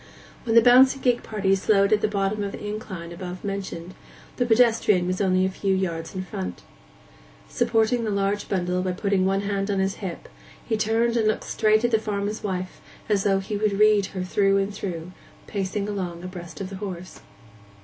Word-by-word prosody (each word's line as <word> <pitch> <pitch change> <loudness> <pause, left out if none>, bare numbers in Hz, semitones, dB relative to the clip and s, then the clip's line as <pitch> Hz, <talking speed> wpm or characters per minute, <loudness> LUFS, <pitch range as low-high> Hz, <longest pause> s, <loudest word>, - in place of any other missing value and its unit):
When 225 -1 0
the 230 - +8
bouncing 260 +2 +6
gig 245 -2 +2
party 195 -3 0
slowed 200 +1 +3
at 210 - +2
the - - +2
bottom 205 0 -1
of 200 - -4
the - - -7
incline 190 -5 -6
above 180 +1 -7
mentioned, 190 -3 -5 0.4
the 245 - +1
pedestrian 225 -5 +4
was 185 +2 -1
only 185 -1 +3
a - - +1
few 190 0 -1
yards 165 -3 -3
in 185 - -3
front. 90 - -6 0.8
Supporting 230 0 +1
the 220 - -1
large 200 0 -1
bundle 180 -1 0
by 185 0 -1
putting 190 0 +1
one 195 +1 +1
hand 200 0 -2
on 200 - 0
his 190 0 0
hip, 185 -4 -6 0.4
he 225 - 0
turned 225 +2 +1
and 220 -2 +2
looked 215 - 0
straight 215 +1 +2
at 240 - +1
the 220 - +3
farmer's 210 0 -3
wife 185 -2 -4 0.3
as 200 -2 +1
though 195 -1 +3
he 195 +2 -3
would 210 0 +1
read 210 -2 +4
her 185 -2 -5
through 195 +1 +2
and 195 +1 -1
through, 180 -4 -5 0.3
pacing 200 0 -3
along 180 -4 -4
abreast 175 -2 -8
of 190 0 -5
the 195 - -6
horse. 185 -3 -7
200 Hz, 195 wpm, -24 LUFS, 185-215 Hz, 0.8 s, the